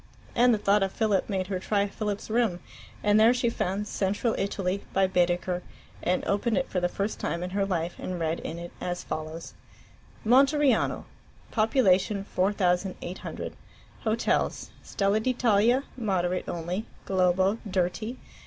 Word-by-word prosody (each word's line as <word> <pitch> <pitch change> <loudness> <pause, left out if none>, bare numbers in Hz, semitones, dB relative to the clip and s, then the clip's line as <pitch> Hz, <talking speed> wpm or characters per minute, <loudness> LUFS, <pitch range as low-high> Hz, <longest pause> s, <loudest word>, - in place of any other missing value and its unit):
And 245 +1 +5
the 225 - +3
thought 205 0 +3
of 195 0 +1
Philip 215 -3 +1
made 190 -2 -1
her 185 -1 -3
try 200 +1 +1
Philip's 205 +1 -4
room, 220 -6 +1 0.4
and 210 0 +4
there 230 +3 +6
she 240 -1 +1
found 200 0 -2
"Central 205 +4 0
Italy," 195 -1 -2
by 195 0 +4
Baedeker, 180 -1 +1 0.4
and 180 +1 0
opened 210 +3 +1
it 270 - 0
for 185 - +1
the 175 0 +1
first 200 +4 -3
time 170 +1 -2
in 180 - -4
her 195 0 0
life 175 -2 -2
and 180 -1 -4
read 165 0 -1
in 165 - -5
it 170 0 -7
as 175 0 -3
follows: 155 +1 -5 0.7
MONTERIANO 275 +4 +3 0.5
(pop. 220 0 +1
4800). 190 -4 0 0.5
Hotels: 225 +1 0
Stella 200 +1 +1
d'Italia, 240 +1 +3
moderate 185 -6 -1
only; 175 +5 -3 0.2
Globo, 190 +2 +2
dirty. 190 +6 -1
195 Hz, 145 wpm, -27 LUFS, 180-220 Hz, 0.7 s, there